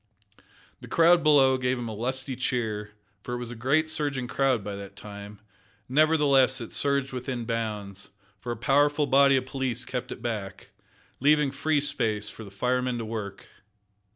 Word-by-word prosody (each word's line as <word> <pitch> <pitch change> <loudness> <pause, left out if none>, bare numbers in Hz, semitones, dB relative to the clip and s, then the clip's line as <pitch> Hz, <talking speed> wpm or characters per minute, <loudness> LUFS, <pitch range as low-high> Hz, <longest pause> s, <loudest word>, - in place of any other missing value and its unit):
The - - -11
crowd 170 +1 +5
below 135 -4 +5
gave 130 0 0
him 120 -1 -5
a 110 - -5
lusty 130 +4 -2
cheer, 110 -4 -2 0.3
for 120 +4 -5
it - - -3
was 120 -1 -6
a - - -7
great 140 +7 +1
surging 145 -5 -1
crowd 130 -5 +1
by 100 0 -5
that 100 -1 -9
time; 100 0 -10 0.5
nevertheless 140 -2 +3
it 115 - -7
surged 140 -1 +1
within 125 -2 -4
bounds, 105 -4 -4 0.3
for 120 +4 -5
a 120 - -4
powerful 145 +4 +2
body 140 0 +5
of 130 - -2
police 130 -2 -2
kept 125 -1 -5
it - - -8
back, 105 -5 -5 0.5
leaving 150 0 +3
free 145 +2 0
space 110 -7 -1
for 110 - -10
the 100 - -10
firemen 125 +4 -1
to 115 - -4
work. 105 -3 -6
125 Hz, 170 wpm, -26 LUFS, 110-140 Hz, 0.5 s, crowd